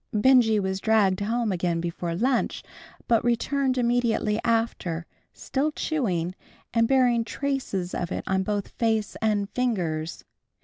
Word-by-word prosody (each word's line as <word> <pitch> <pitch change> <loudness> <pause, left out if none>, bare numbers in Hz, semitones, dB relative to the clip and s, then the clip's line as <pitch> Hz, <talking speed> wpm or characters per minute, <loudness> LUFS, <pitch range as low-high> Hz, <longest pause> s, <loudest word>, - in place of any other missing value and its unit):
Benjy 225 -1 +4
was 190 -1 -2
dragged 205 -3 +3
home 225 +2 0
again 175 -2 0
before 170 0 -3
lunch, 245 +6 0 0.4
but 230 -1 +3
returned 260 +3 +1
immediately 235 -3 +1
after, 225 -8 -1 0.3
still 285 +3 -2
chewing, 185 - -1 0.4
and 230 -1 +3
bearing 245 -3 +3
traces 225 -7 -3
of 175 - -3
it - - -3
on 190 0 +1
both 205 +1 -2
face 220 -3 -1
and 210 -2 +1
fingers. 175 -10 -2
220 Hz, 130 wpm, -26 LUFS, 190-245 Hz, 0.4 s, Benjy